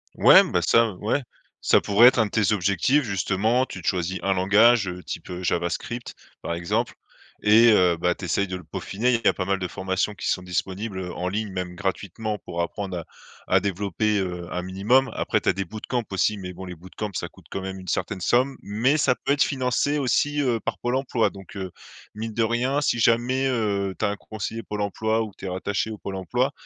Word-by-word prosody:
Ouais, - - +8
ben, - - +1
ça 115 -2 +3
ouais, 110 +9 -1 0.4
ça - - +4
pourrait 105 +4 +6
être 130 - +5
un 110 - +4
de 105 - -7
tes 110 -1 +2
objectifs 100 +9 +2
justement, 110 +3 +1
tu 95 - -8
te - - -5
choisis 90 +1 0
un 100 - +2
langage, 105 +3 +4
heu, 90 0 -6
type, - - -7
heu, 90 +1 -6
javascript, 90 +8 -2 0.3
par - - -3
exemple 85 0 -1 0.5
et 110 +3 +7
heu, 90 -5 +4
bah 90 +1 +1
tu - - -7
essayes 100 +4 0
de 90 - -4
le 90 - -11
peaufiner, 110 +9 -1
il 115 - +1
y - - +3
a - - +5
pas 95 - -3
mal 100 +1 0
de 90 - -2
formations 95 +3 -2
qui - - -5
sont 90 - 0
disponibles, 95 +3 -3
heu, 90 -1 -5
en 90 - -3
ligne, 105 +1 -3
même 90 -1 -4
gratuitement, 100 +3 -3
pour 85 -1 -4
apprendre 95 +1 -4
à 85 - -6 0.4
à - - +5
développer, 100 +2 -1
heu, 90 -3 -3
un 90 - -3
minimum. 105 +9 +2
Après - - 0
tu - - -9
as - - +5
des 95 - -2
bootcamps 110 +6 -4
aussi, 105 +3 +1
mais 90 -1 -6
bon, 95 +2 -8
les 90 - -7
bootcamps, 95 +5 -7
ça 90 - -4
coûte - - -20
quand 95 - -3
même 95 0 -5
une 95 - -12
certaine 95 - -2
somme. 130 +8 +2
Mais 115 +9 +1
ça 135 -4 +3
peut 140 - -1
être 145 - +3
financé 135 +2 0
aussi, 145 +3 +1
heu, 125 -4 +1
par - - -4
Pôle 120 +1 -1
emploi, 130 -4 +1
donc, 95 -2 -13
heu, 95 -1 -4 0.5
mine 110 +1 -5
de 115 - 0
rien, 125 +5 +1
si 145 - +1
jamais, 120 +3 +2
heu, 100 -6 0
tu - - -3
as - - +2
un 100 - -2
conseiller 110 +2 -6
Pôle 105 +1 -4
emploi 110 +2 0
ou 110 - -3
que 100 - -20
tu - - -9
es - - -2
rattaché 100 +4 -2
au 105 - -7
Pôle 100 - -5
emploi, 120 +8 0
100 Hz, 230 wpm, -24 LUFS, 95-115 Hz, 0.5 s, Ouais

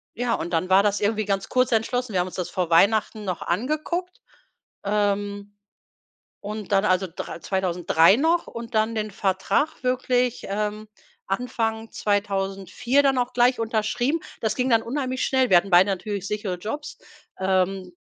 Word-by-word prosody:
Ja, 240 0 -1
und 170 - -3
dann 175 +2 0
war 190 +1 +6
das 205 0 +1
irgendwie 215 +1 0
ganz 195 -1 -1
kurz 255 -1 +1
entschlossen. 230 +1 0
Wir 185 - +1
haben 180 - -2
uns - - -9
das 180 - -3
vor 180 -3 -2
Weihnachten 215 +4 +3
noch 185 -4 -3
angeguckt, 305 - -2 0.6
ähm, 205 0 -1 0.9
und 210 0 -6
dann 195 +1 +3
also 185 0 +2
dr 165 - -7
2003 180 -1 +3
noch 330 +5 +1
und 230 0 -8
dann 220 +1 +1
den 215 -1 -2
Vertrag 195 +10 -1
wirklich, 250 -1 0
ähm, 210 +1 -3 0.4
Anfang 225 +1 -2
2004 200 +5 0
dann 270 -2 +2
auch 245 0 -1
gleich 245 0 +3
unterschrieben. 225 +7 0 0.2
Das 220 -2 0
ging 255 0 0
dann 225 -1 +4
unheimlich 255 +1 -2
schnell. 260 -2 +2
Wir 185 - +7
hatten 195 +3 -3
beide 180 +2 +6
natürlich 195 +1 -3
sichere 205 -3 -3
Jobs, 225 +11 -6 0.4
ähm, 190 0 0
210 Hz, 160 wpm, -24 LUFS, 195-245 Hz, 0.9 s, Wir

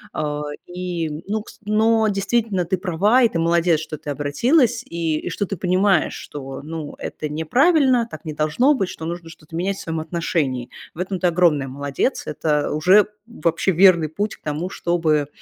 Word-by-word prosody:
Э, 150 -1 -2 0.3
и, 175 -2 -4 0.2
ну, 215 +1 -2
кс - - -15
но 220 +1 +3
действительно, 200 -2 0
ты 185 +2 0
права, 200 +7 +2
и 235 - +5
ты 170 - -3
молодец, 170 0 +3
что 155 0 -6
ты 145 - -8
обратилась, 230 - +2
и 165 -2 -2
и - - -5
что 190 +4 -2
ты 195 0 -5
понимаешь, 185 0 +2
что, 135 -2 -8
ну, 155 -1 -6
это 150 - -4
неправильно, 250 - +3
так 155 - -9
не 155 - -4
должно 155 - +2
быть, 195 -10 -1
что 160 - -7
нужно 170 0 -5
что-то 160 0 -13
менять 190 +4 -1
в - - -8
своем 165 -1 -3
отношении. 155 -6 -2 0.2
В 165 - -14
этом 185 0 -2
ты 180 - +2
огромная 165 -5 +3
молодец, 140 - -2
это 150 -1 0
уже 185 +7 +5 0.2
вообще 190 -5 0
верный 170 -2 +5
путь 205 +6 -3
к - - -40
тому, 155 +4 -3
чтобы, 160 -6 0
170 Hz, 185 wpm, -21 LUFS, 155-200 Hz, 0.3 s, и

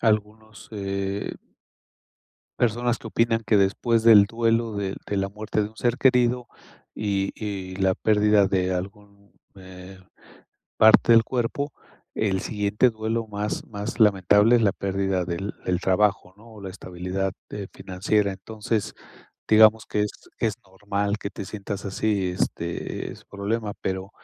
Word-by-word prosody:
algunos, 110 -1 -2
eh 100 0 -3 1.3
personas 120 +1 +1
que - - -11
opinan 115 0 +1
que 105 -1 +4
después 110 +4 +2
del 110 -3 +8
duelo 115 +1 0
de 100 -1 -3
de 100 - -2
la 95 0 -1
muerte 105 +1 -2
de 105 - -3
un 110 - -21
ser 120 +1 0
querido, 125 -2 +3 0.5
y 100 -2 -1
y 95 -3 -5
la 95 -1 +2
pérdida 105 -1 +3
de 95 -1 0
algún, 100 +2 -7 0.2
eh, 95 0 -12 0.8
parte 110 +1 +6
del 115 -1 +7
cuerpo, 130 +4 -2 0.4
el 95 -3 0
siguiente 105 +5 +1
duelo 110 0 -3
más 105 0 -4
más 105 +2 -6
lamentable 105 +2 +5
es 115 - +3
la 100 -3 +3
pérdida 95 -2 -1
del 90 +3 -4
del 90 0 0
trabajo, 95 -1 +1
¿no?, 115 +2 -17
o 105 - -12
la 95 - -6
estabilidad, 90 0 -4 0.2
eh, 100 -2 -6
financiera. 100 +2 0
Entonces, 105 +2 -3 0.6
digamos 110 0 +6
que 105 - -1
es 105 - -6
que 115 - 0
es 105 - -1
normal 100 +2 -2
que 100 - -5
te - - -7
sientas 100 0 -6
así 100 -1 -1
este, 85 -1 -3
ese - - -14
problema. 105 +1 -3
Pero, 95 +1 -3
105 Hz, 150 wpm, -24 LUFS, 95-110 Hz, 1.3 s, del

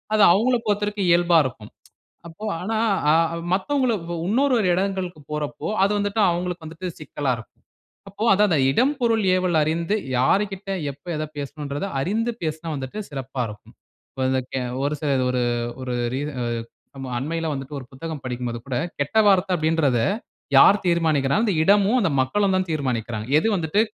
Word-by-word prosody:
அது 210 - +5
அவங்கள 245 +7 +3
பொறுத்தவரைக்கும் 205 -1 0
இயல்பா 170 0 +4
இருக்கும். 110 -4 -6 0.6
அப்போ 170 +6 -10 0.2
ஆனா, 220 +5 -2 0.4
அ - - +5 0.4
மத்தவங்கள 255 +6 +1 0.3
இன்னொரு 255 +6 +2 0.2
இடங்களுக்கு 185 -3 -2
போறப்போ 150 -1 -3 0.2
அது 200 - +1
வந்துட்டு 205 +2 -1
அவங்களுக்கு 175 -1 -3
வந்துட்டு 165 +3 -7
சிக்கலா 145 -3 -2
இருக்கும். 115 - -13 0.6
அப்போ 200 +3 -5
அதுதான் 205 +1 +4
அந்த 160 - +3
"இடம், 260 - +2
பொருள், 230 -3 +2
ஏவல்" 185 -1 0
அறிந்து 165 +5 0 0.2
யாருக்கிட்ட 195 +8 +1 0.2
எப்ப 140 +5 -22
எத 155 - -2
பேசணும்ன்றத 145 +3 -4
அறிந்து 225 - 0
பேசினா 160 +1 -4
வந்துட்டு 135 +8 -6
சிறப்பா 135 -2 -4
இருக்கும். 105 0 -12 0.4
இப்ப 130 -1 -2
இந்த 130 0 +1
கே 130 - -1 0.2
ஒரு 145 +1 0
சில 150 -2 -1 0.2
ஒரு 125 0 0 0.4
ஒரு 125 -1 -3 0.2
ரீச 145 +3 -2 0.7
அ-அண்மையில 135 +6 -3
வந்துட்டு 135 +1 -6
ஒரு 135 - -8
புத்தகம் 155 +3 -6
படிக்கும்போது 125 -1 -3
கூட 130 -2 -3 0.2
"கெட்ட 145 +10 +1
வார்த்தை 190 -1 +4
அப்படின்றத, 155 -6 +1 0.6
யார் 200 +9 +7
தீர்மானிக்கிறாங்க 160 +1 +2
அந்த 205 - +1
இடமும் 205 +6 +4
அந்த 190 -7 +1
மக்களும் 195 +9 +1
தான் 185 -1 -1
தீர்மானிக்கிறாங்க. 120 -7 -2
எது 220 - +1
வந்துட்டு 170 +3 +1
165 Hz, 155 wpm, -23 LUFS, 140-200 Hz, 0.7 s, யார்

